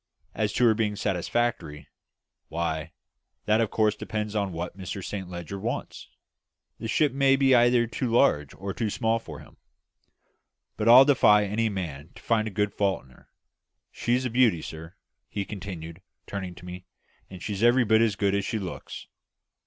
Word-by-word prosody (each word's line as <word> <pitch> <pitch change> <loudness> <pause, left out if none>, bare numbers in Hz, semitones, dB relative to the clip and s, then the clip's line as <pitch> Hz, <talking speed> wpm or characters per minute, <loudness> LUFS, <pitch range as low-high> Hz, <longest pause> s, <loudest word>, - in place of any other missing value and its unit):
As 105 -1 -1
to 125 - +3
her 115 - +6
being 105 -1 -1
satisfactory 100 -4 -2 0.6
why, 80 -2 -3 0.5
that 110 +1 +3
of 110 - 0
course 110 -1 +1
depends 105 -1 -4
upon 100 -3 -1
what 85 +1 -5
Mr 95 0 -6
Saint 95 -3 -5
Leger 90 +2 -6
wants; - - -5 0.7
the - - -5
ship 145 +5 +2
may 135 0 +4
be 135 -1 +3
either 120 0 +5
too 120 +2 -3
large 95 - +2
or 100 0 -5
too 110 +1 -2
small 115 +1 0
for 80 -9 -10
him; - - -17 1.2
but 110 +2 +1
I'll 130 +3 +10
defy 105 -7 +5
any 110 +3 0
man 85 -6 -5
to - - -14
find 110 -2 +1
a 105 0 0
fault 100 -1 -1
in 65 - -20
her. - - -22 0.6
She's 125 +2 0
a 125 - -2
beauty, 115 -9 +3
sir," 80 +3 -9 0.3
he 100 -1 -3
continued, 90 -4 -8 0.2
turning 95 -3 -6
to 90 - -13
me, 90 +1 -9 0.4
"and 95 -2 -10
she's 100 -2 -4
every 120 +2 +4
bit 110 +1 +4
as 110 -3 +2
good 100 -1 +1
as 100 0 0
she 110 - -2
looks." 95 -4 -7
105 Hz, 175 wpm, -26 LUFS, 90-115 Hz, 1.2 s, I'll